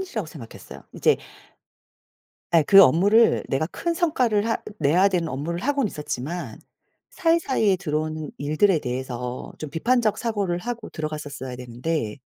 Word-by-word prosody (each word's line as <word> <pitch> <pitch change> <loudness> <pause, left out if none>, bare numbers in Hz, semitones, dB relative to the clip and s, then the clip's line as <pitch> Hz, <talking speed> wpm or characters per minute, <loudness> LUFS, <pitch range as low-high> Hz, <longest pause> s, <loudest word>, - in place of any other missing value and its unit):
이슈라고 235 - -4
생각했어요. 135 -7 -11
이제 - - +3 1.4
아 165 -2 +6
그 195 0 +9
업무를 200 - +4
내가 135 +4 0
큰 340 - -3
성과를 250 - +1
하 225 - +1 0.2
내야 170 +7 +4
되는 175 -4 -1
업무를 155 +6 -4
하고는 280 -2 +1
있었지만 150 - -5 0.5
사이사이에 300 - +2
들어오는 155 -3 -3
일들에 155 +4 +2
대해서 125 -1 -5
좀 155 - -6
비판적 220 - +1
사고를 205 -7 -1
하고 235 +3 -5
들어갔었어야 150 -4 -5
되는데 125 0 -3
170 Hz, 340 characters per minute, -24 LUFS, 145-220 Hz, 1.4 s, 그